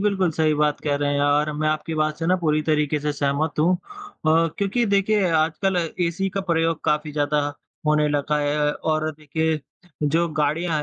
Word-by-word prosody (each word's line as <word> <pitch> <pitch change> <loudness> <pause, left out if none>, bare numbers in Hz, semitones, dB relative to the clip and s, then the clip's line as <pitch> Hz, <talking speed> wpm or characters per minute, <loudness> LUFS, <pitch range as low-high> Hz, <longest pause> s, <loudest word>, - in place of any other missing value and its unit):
बिल्कुल 195 -4 +1
सही 155 -1 +2
बात 150 0 +1
कह 145 - +1
रहे 145 0 0
हैं 140 - +1
और 145 +1 +2
मैं 155 0 0
आपकी 155 +1 -2
बात 155 -1 0
से 165 - -2
ना 185 +1 +3
पूरी 155 -3 +1
तरीके 150 -1 +1
से 150 0 -1
सहमत 145 +2 -1
हूँ 175 +4 +4
अ, 175 - -1
क्योंकि 205 +4 +1
देखिए 200 -1 +2
आजकल 160 +4 +1 0.3
एसी 190 +3 -1
का - - +2
प्रयोग 165 -1 +1
काफ़ी 150 0 0
ज़्यादा 145 0 0 0.5
होने 150 0 +3
लगा 150 +1 0
है 150 0 +1
और 155 0 -1
देखिए 160 +1 -1 0.4
जो 165 +4 +2
गाड़ियाँ 155 +1 0
155 Hz, 185 wpm, -23 LUFS, 150-170 Hz, 0.5 s, हूँ